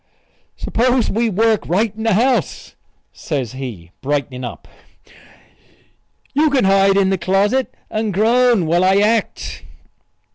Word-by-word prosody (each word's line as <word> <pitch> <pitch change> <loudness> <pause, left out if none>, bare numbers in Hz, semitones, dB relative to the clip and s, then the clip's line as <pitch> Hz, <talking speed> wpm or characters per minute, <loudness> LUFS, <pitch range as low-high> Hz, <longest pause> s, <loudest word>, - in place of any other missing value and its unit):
"S'pose 245 0 0
we 230 +2 0
work 220 +2 +1
right 210 +4 0
in 220 - -8
the 225 -3 +1
house?" 250 +4 0 0.4
says 135 -8 -4
he, 120 -11 -8
brightening 140 -2 -3
up. 120 - -8 1.7
"You 305 +3 +3
can 275 -2 +1
hide 195 0 +3
in 195 -1 +2
the 190 - -1
closet 205 +8 +1 0.2
and 215 -1 -2
groan 230 0 +2
while 170 +3 +1
I 190 +1 +3
act." 215 +2 -1
200 Hz, 130 wpm, -18 LUFS, 175-230 Hz, 1.7 s, You